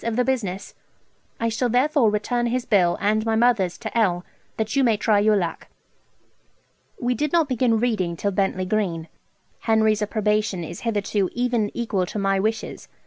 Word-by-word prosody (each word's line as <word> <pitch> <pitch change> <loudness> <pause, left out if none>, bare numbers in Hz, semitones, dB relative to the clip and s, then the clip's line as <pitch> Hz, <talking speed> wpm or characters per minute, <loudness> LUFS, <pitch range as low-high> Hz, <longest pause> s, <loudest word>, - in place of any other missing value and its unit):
of 230 -1 -2
the 250 +1 +1
business. 200 -8 -2 0.7
I 230 - 0
shall 235 +2 -1
therefore 255 0 +3
return 240 +3 -1
his 245 +1 -1
bill, 180 -5 +3
and 215 +2 +1
my 225 0 0
mother's 220 -6 +2
2_l_., 215 -6 0 0.3
that 220 +2 -2
you 275 - +3
may 230 -4 +3
try 210 0 +2
your 210 +1 +3
luck. 170 -5 -2 1.3
We 245 0 0
did 295 +5 -2
not 335 -3 +3
begin 245 -3 +1
reading 200 -8 -1
till 200 - -1
Bentley 190 -1 0
Green. 180 -5 -2 0.5
Henry's 220 -1 +2
approbation 210 -3 0
is 170 +2 -8
hitherto 205 -4 -1
even 240 -3 0
equal 205 -6 -1
to - - -6
my 195 -1 +1
wishes. 220 +2 -3
215 Hz, 165 wpm, -23 LUFS, 195-240 Hz, 1.3 s, therefore